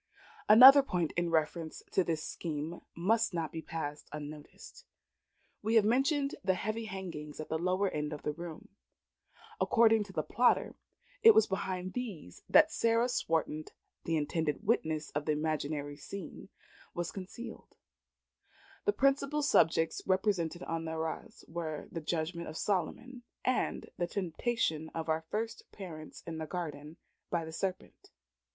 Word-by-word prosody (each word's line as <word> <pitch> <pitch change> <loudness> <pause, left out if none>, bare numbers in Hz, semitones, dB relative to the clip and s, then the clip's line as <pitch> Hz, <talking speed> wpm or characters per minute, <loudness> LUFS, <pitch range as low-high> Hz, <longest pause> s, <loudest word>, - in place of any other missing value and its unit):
Another 260 +6 +11
point 180 - -1
in 175 0 0
reference 160 0 -1
to 190 - +3
this 160 -2 -2
scheme 160 +1 -4
must 215 +3 +2
not 160 -3 -2
be 160 - -5
passed 150 -3 -5
unnoticed. 150 - -9 0.8
We 220 +2 0
have 220 -2 +6
mentioned 275 +5 +2
the 190 0 +2
heavy 215 +4 -3
hangings 170 -8 -6
at 155 - -6
the 160 - -1
lower 185 +3 +1
end 150 -4 -2
of 150 - -6
the 150 - -1
room. 170 0 -8 0.9
According 225 -2 +4
to 195 - -11
the 155 -4 -1
plotter, 245 +9 +2 0.5
it 450 -1 +9
was 440 - +6
behind 185 -1 -3
these 205 - -6
that 310 +1 +7
Sarah 230 +1 +2
Swarton 160 -8 -1 0.4
the 165 -1 +1
intended 155 +4 -1
witness 160 -8 0
of 150 0 -2
the 155 - +2
imaginary 150 -1 -2
scene 195 +4 -8 0.5
was 175 -1 -2
concealed. 195 +5 -9 1.1
The 415 - +3
principal 275 +1 +2
subjects 165 - +3
represented 185 -3 +1
on 165 0 -3
the 160 - -3
arras 160 +8 -5
were 160 -2 -4
the 165 - -4
Judgment 170 +2 -2
of 155 - -6
Solomon, 210 +7 -2 0.2
and 255 - 0
the 175 - +1
Temptation 175 -3 -1
of 160 -1 -3
our 160 0 +1
first 225 +2 -4
Parents 160 -6 -9
in 160 -1 -5
the 160 - -4
Garden 150 -3 -5 0.3
by 170 -2 -1
the 160 - -8
Serpent. 185 +2 -4
170 Hz, 145 wpm, -32 LUFS, 155-220 Hz, 1.1 s, Another